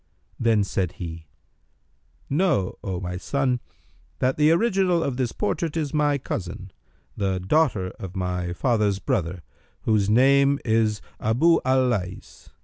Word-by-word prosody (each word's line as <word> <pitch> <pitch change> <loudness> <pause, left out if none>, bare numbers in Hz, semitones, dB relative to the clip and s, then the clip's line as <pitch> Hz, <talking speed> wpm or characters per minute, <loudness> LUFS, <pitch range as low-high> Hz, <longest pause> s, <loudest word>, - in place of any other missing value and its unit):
Then 115 -3 +3
said 95 -3 -2
he, 80 -3 -8 1.0
"Know, 145 - 0
O 95 -3 -3
my 90 -1 -4
son, 130 +4 0 0.6
that 130 +1 +1
the 150 0 +4
original 185 -1 +2
of 135 - -2
this 125 -2 -1
portrait 155 - -2
is 150 -4 -2
my 145 -1 +2
cousin, 95 -6 -5 0.4
the 95 -2 -1
daughter 100 - +1
of 95 -1 -7
my 90 -1 -2
father's 105 0 +1
brother, 90 -2 -2 0.4
whose 105 -3 +1
name 140 +4 +4
is 110 -2 +1 0.2
Abъ 160 +10 +3
al 130 0 +3
Lays. 95 -6 -4
110 Hz, 135 wpm, -24 LUFS, 95-140 Hz, 1.0 s, the